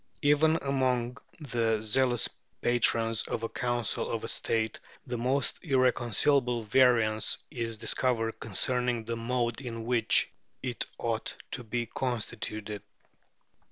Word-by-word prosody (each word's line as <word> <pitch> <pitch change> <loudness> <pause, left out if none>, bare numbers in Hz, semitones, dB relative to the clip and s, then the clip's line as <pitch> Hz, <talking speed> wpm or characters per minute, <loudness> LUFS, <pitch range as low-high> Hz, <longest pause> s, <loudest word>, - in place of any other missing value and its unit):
Even 150 +2 +4
among 130 -2 0 0.2
the 115 -6 0
zealous 120 +2 +2 0.4
patrons 115 -2 +3
of 115 - -3
a 115 - -2
council 120 -3 -1
of - - -3
state, 110 -1 -1 0.3
the 125 - -4
most 130 +3 0
irreconcilable 125 - +2
variance 110 -2 +3
is 115 -2 -3
discovered 115 0 0
concerning 125 +2 +1
the 115 +1 -2
mode 120 +1 -1
in 115 -3 -6
which 120 -1 +2 0.3
it 125 -3 -3
ought 115 -1 -2
to 125 - -3
be 120 +1 -2
constituted." 110 -4 -4
120 Hz, 115 wpm, -29 LUFS, 115-125 Hz, 0.4 s, Even